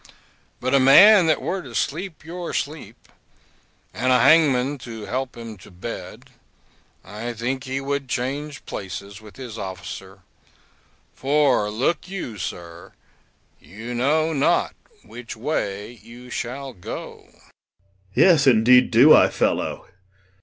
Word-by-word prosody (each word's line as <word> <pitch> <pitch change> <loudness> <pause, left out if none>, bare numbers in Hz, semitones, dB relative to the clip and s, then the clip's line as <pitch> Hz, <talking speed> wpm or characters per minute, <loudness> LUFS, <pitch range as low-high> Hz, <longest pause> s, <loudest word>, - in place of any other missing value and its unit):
But 130 +1 -2
a 140 - +5
man 180 +8 +7
that 155 - +1
were 190 0 -2
to 125 -7 -11
sleep 160 - -3
your 175 +1 -6
sleep, 140 -7 -6 0.9
and 130 - 0
a 125 - +5
hangman 140 -2 +4
to 115 -3 -8
help 130 -1 -4
him 115 -2 -9
to 95 - -16
bed, 95 +5 -9 0.7
I 110 +5 -6
think 130 +4 -4
he 130 +1 -3
would 140 -1 -3
change 140 +4 -4
places 100 +1 -7
with 105 -1 -15
his 120 -4 -8
officer; 95 0 -8 0.9
for 135 -6 +1
look 130 +11 -1
you, 150 - -6
sir, 85 -1 -8 0.7
you 115 +6 -9
know 155 +6 +1
not 150 +4 +1 0.3
which 120 -2 -10
way 110 -4 -4
you 120 +1 -13
shall 135 +3 -5
go. 90 - -9
POSTHUMUS. - - -26 0.6
Yes 160 -7 +5
indeed 125 +1 +5
do 125 +6 +7
I, - - +5
fellow. - - -1
125 Hz, 130 wpm, -22 LUFS, 110-145 Hz, 0.9 s, man